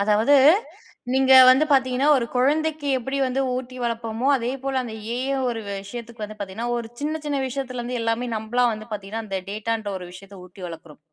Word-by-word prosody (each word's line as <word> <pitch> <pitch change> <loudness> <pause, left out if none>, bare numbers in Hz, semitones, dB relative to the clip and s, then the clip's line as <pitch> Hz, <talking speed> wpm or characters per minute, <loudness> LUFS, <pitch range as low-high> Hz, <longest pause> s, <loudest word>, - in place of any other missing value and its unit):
அதாவது 215 +7 +3 0.8
நீங்க 265 0 +4 0.2
வந்து 265 +4 +6
பார்த்திங்கன்னா, 265 0 +3
ஒரு 240 - 0
கொழந்தைக்கு 295 +3 +1
எப்படி 265 +3 -4
வந்து 260 +1 -1 0.2
ஊட்டி 255 0 -6
வளப்போமோ, 230 +1 -2
அதேபோல 265 +2 -2
அந்த 230 -3 -7 0.2
ஏஐ 270 +2 -1 0.2
ஒரு 225 -1 -4 0.2
விஷயத்துக்கு 235 +1 -7
வந்து 215 +1 -9
பார்த்திங்கன்னா, 200 +4 -4
ஒரு 230 -1 -6
சின்ன, 310 +2 -2
சின்ன 285 -2 -1
விஷயத்திலருந்து 250 -2 -4
எல்லாமே 230 +2 -1
நம்பளா 240 +3 +1
வந்து 215 +1 -8
பார்த்திங்கன்னா, 210 +2 -5
அந்த 195 -2 -3
டேட்டான்ற 215 0 -3
ஒரு 180 - -9
விஷயத்த 195 +1 -12
ஊட்டி 180 +1 -16
வளர்க்கிறோம். 165 -2 -10
240 Hz, 165 wpm, -23 LUFS, 215-265 Hz, 0.8 s, வந்து